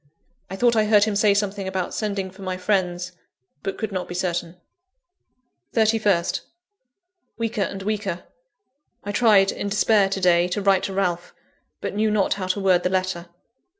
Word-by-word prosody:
I 190 Hz, -, -5 dB
thought 235 Hz, +3 st, +3 dB
I 215 Hz, -1 st, +3 dB
heard 210 Hz, -1 st, +5 dB
him 210 Hz, -1 st, 0 dB
say 205 Hz, 0 st, +4 dB
something 200 Hz, -1 st, -1 dB
about 190 Hz, -2 st, -3 dB
sending 200 Hz, -3 st, -3 dB
for 190 Hz, +2 st, -15 dB
my 185 Hz, -1 st, -3 dB
friends, 180 Hz, -2 st, -1 dB, 0.5 s
but 195 Hz, -1 st, -4 dB
could 220 Hz, -1 st, -3 dB
not 185 Hz, -2 st, -3 dB
be 175 Hz, -, -7 dB
certain. 175 Hz, -1 st, -2 dB, 1.2 s
31st. 215 Hz, -6 st, +2 dB, 1.0 s
Weaker 230 Hz, -2 st, -2 dB
and 195 Hz, 0 st, -3 dB
weaker. 200 Hz, -4 st, -3 dB, 0.8 s
I 205 Hz, -, -4 dB
tried 205 Hz, -3 st, +4 dB
in 200 Hz, -, -4 dB
despair, 205 Hz, -1 st, +3 dB
to 195 Hz, -, -2 dB
day, 175 Hz, -1 st, +4 dB
to 180 Hz, +3 st, -2 dB
write 195 Hz, -1 st, +4 dB
to 195 Hz, -, -4 dB
Ralph; 180 Hz, -2 st, -2 dB, 0.5 s
but -, -, -3 dB
knew 215 Hz, +1 st, +1 dB
not 210 Hz, -2 st, +2 dB
how 190 Hz, -2 st, -5 dB
to 185 Hz, +2 st, -1 dB
word 185 Hz, -2 st, +3 dB
the 180 Hz, -, 0 dB
letter. 185 Hz, -2 st, -2 dB
195 Hz, 170 wpm, -23 LUFS, 185-210 Hz, 1.2 s, heard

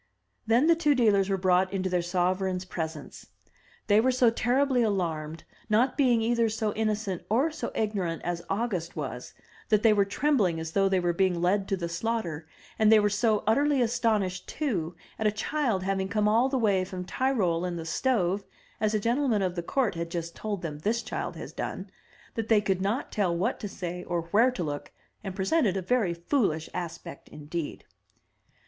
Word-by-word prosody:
Then 235 Hz, +5 st, +4 dB
the 335 Hz, +1 st, +5 dB
two 300 Hz, -3 st, +2 dB
dealers 205 Hz, -6 st, +3 dB
were 195 Hz, -, +1 dB
brought 185 Hz, 0 st, +2 dB
into 190 Hz, -1 st, -1 dB
their 180 Hz, -1 st, +1 dB
sovereign's 185 Hz, +1 st, 0 dB
presence. 160 Hz, -4 st, -6 dB, 0.6 s
They 210 Hz, 0 st, +4 dB
were 260 Hz, +2 st, +3 dB
so 250 Hz, -2 st, +4 dB
terribly 250 Hz, +2 st, +2 dB
alarmed, 165 Hz, -7 st, -1 dB, 0.3 s
not 235 Hz, +5 st, +3 dB
being 245 Hz, -5 st, +3 dB
either 230 Hz, 0 st, +2 dB
so 215 Hz, -1 st, -1 dB
innocent 215 Hz, -5 st, -2 dB
or 265 Hz, +9 st, +2 dB
so 305 Hz, -1 st, -5 dB
ignorant 195 Hz, -6 st, -2 dB
as 175 Hz, -1 st, -2 dB
August 195 Hz, -5 st, -2 dB
was, 130 Hz, -5 st, -6 dB, 0.3 s
that 215 Hz, -1 st, +3 dB
they 225 Hz, -2 st, +6 dB
were 205 Hz, -1 st, +4 dB
trembling 200 Hz, -, +1 dB
as 160 Hz, 0 st, -5 dB
though 195 Hz, +2 st, +2 dB
they 190 Hz, -1 st, +2 dB
were 175 Hz, -1 st, 0 dB
being 185 Hz, -1 st, +1 dB
led 195 Hz, +3 st, +1 dB
to 195 Hz, -, 0 dB
the 170 Hz, -2 st, -3 dB
slaughter, 170 Hz, -4 st, -3 dB, 0.3 s
and 215 Hz, 0 st, +5 dB
they 220 Hz, -, +8 dB
were 205 Hz, 0 st, +2 dB
so 215 Hz, 0 st, +1 dB
utterly 280 Hz, +6 st, +3 dB
astonished 220 Hz, -6 st, 0 dB
too 180 Hz, -, -2 dB, 0.2 s
at 220 Hz, -, +2 dB
a -, -, +3 dB
child 220 Hz, -2 st, -1 dB
having 190 Hz, 0 st, -1 dB
come 210 Hz, +1 st, +1 dB
all 230 Hz, +5 st, +3 dB
the 270 Hz, -, 0 dB
way 200 Hz, -6 st, +2 dB
from 185 Hz, 0 st, -6 dB
Tyrol 190 Hz, -9 st, 0 dB
in 180 Hz, -1 st, -2 dB
the 165 Hz, -1 st, -5 dB
stove, 200 Hz, -1 st, 0 dB, 0.4 s
as 215 Hz, 0 st, +1 dB
a -, -, +2 dB
gentleman 235 Hz, -1 st, +1 dB
of 185 Hz, -1 st, 0 dB
the 175 Hz, -, -3 dB
court 245 Hz, +6 st, 0 dB
had 170 Hz, 0 st, -4 dB
just 170 Hz, 0 st, -5 dB
told 205 Hz, -4 st, -4 dB
them 150 Hz, -3 st, -5 dB
this 225 Hz, +8 st, -1 dB
child -, -, -4 dB
had -, -, -9 dB
done, -, -, -5 dB, 0.4 s
that 225 Hz, -2 st, -3 dB
they 220 Hz, -2 st, +6 dB
could 195 Hz, -2 st, -1 dB
not 205 Hz, +7 st, -1 dB
tell 185 Hz, -5 st, 0 dB
what 180 Hz, -, -1 dB
to 210 Hz, -, -4 dB
say 180 Hz, -2 st, -5 dB
or 175 Hz, -2 st, -2 dB
where 230 Hz, +5 st, +5 dB
to 225 Hz, -8 st, -4 dB
look, 145 Hz, -2 st, -5 dB, 0.3 s
and 195 Hz, -2 st, -5 dB
presented 195 Hz, -, +1 dB
a -, -, -1 dB
very 200 Hz, -4 st, +1 dB
foolish 170 Hz, -, 0 dB
aspect 170 Hz, -5 st, -7 dB
indeed. 150 Hz, +1 st, -6 dB
200 Hz, 190 wpm, -28 LUFS, 175-230 Hz, 0.6 s, they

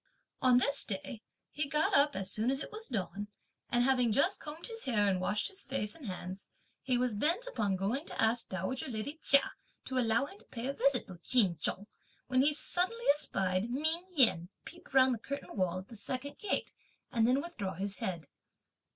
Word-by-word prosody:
On 255 Hz, -1 st, +5 dB
this 280 Hz, +3 st, +2 dB
day, 215 Hz, +3 st, -5 dB, 0.3 s
he 295 Hz, -1 st, -2 dB
got 300 Hz, +2 st, +1 dB
up 285 Hz, +1 st, +4 dB
as 195 Hz, -1 st, -2 dB
soon 220 Hz, +3 st, +1 dB
as 270 Hz, 0 st, +1 dB
it -, -, -6 dB
was 440 Hz, +1 st, -8 dB
dawn, 205 Hz, -3 st, -3 dB, 0.4 s
and 240 Hz, 0 st, +2 dB
having 250 Hz, -3 st, +3 dB
just 345 Hz, -, +2 dB
combed 310 Hz, +2 st, -7 dB
his 455 Hz, -1 st, -3 dB
hair 210 Hz, -5 st, +2 dB
and 185 Hz, -2 st, +1 dB
washed 210 Hz, +3 st, 0 dB
his 395 Hz, -1 st, 0 dB
face 210 Hz, -6 st, -2 dB
and 290 Hz, -8 st, -10 dB
hands, 185 Hz, +1 st, -6 dB, 0.3 s
he 255 Hz, -2 st, +1 dB
was 250 Hz, -1 st, 0 dB
bent 330 Hz, -, +1 dB
upon 215 Hz, -, -1 dB
going 215 Hz, -, -2 dB
to -, -, -8 dB
ask 230 Hz, +2 st, +2 dB
dowager 190 Hz, +8 st, -3 dB
lady 260 Hz, +6 st, -4 dB
Chia 280 Hz, -1 st, +6 dB, 0.3 s
to 260 Hz, -1 st, -1 dB
allow 230 Hz, +1 st, +2 dB
him 390 Hz, +8 st, -13 dB
to -, -, -21 dB
pay 235 Hz, 0 st, -6 dB
a 275 Hz, -, -1 dB
visit 275 Hz, -2 st, +1 dB
to 180 Hz, -3 st, -11 dB
Ch'in 195 Hz, -3 st, +3 dB
Chung, 190 Hz, +6 st, -1 dB, 0.4 s
when 255 Hz, 0 st, +2 dB
he 290 Hz, +3 st, +4 dB
suddenly 370 Hz, +9 st, -1 dB
espied 195 Hz, -8 st, -1 dB
Ming 315 Hz, +7 st, 0 dB
Yen 180 Hz, -, +5 dB, 0.2 s
peep 350 Hz, +2 st, -12 dB
round 260 Hz, -1 st, +5 dB
the 230 Hz, -, -4 dB
curtain 280 Hz, +3 st, -6 dB
wall 185 Hz, -3 st, 0 dB
at 185 Hz, +1 st, -8 dB
the 235 Hz, -, -12 dB
second 255 Hz, +6 st, -4 dB
gate, 415 Hz, -, -2 dB, 0.4 s
and 230 Hz, -2 st, +2 dB
then 255 Hz, +3 st, +3 dB
withdraw 260 Hz, -, -5 dB
his 195 Hz, +2 st, -3 dB
head. 175 Hz, -4 st, -3 dB
250 Hz, 205 wpm, -32 LUFS, 205-285 Hz, 0.4 s, Chia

